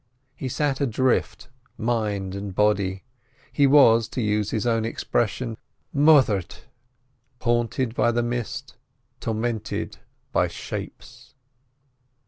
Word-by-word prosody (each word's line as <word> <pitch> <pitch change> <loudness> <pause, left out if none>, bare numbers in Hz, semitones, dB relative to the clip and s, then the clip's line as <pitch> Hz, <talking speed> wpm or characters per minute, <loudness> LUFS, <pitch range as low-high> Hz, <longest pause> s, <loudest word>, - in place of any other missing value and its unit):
He 130 -1 -4
sat 145 +1 -1
adrift 130 -1 0 0.3
mind 105 -5 -1
and 100 -1 -6
body. 100 -2 +1 0.5
He 140 -1 +4
was, 115 -5 +6
to 120 - -5
use 105 -2 0
his 110 +1 -2
own 115 -2 +1
expression, 115 0 -1 0.4
"moithered." 140 - +4 0.9
Haunted 120 0 0
by 120 -1 +2
the 120 0 0
mist, 120 -1 -4 0.4
tormented 110 -1 -3 0.3
by - - +2
"shapes." 125 +3 -8
115 Hz, 105 wpm, -24 LUFS, 105-125 Hz, 0.9 s, was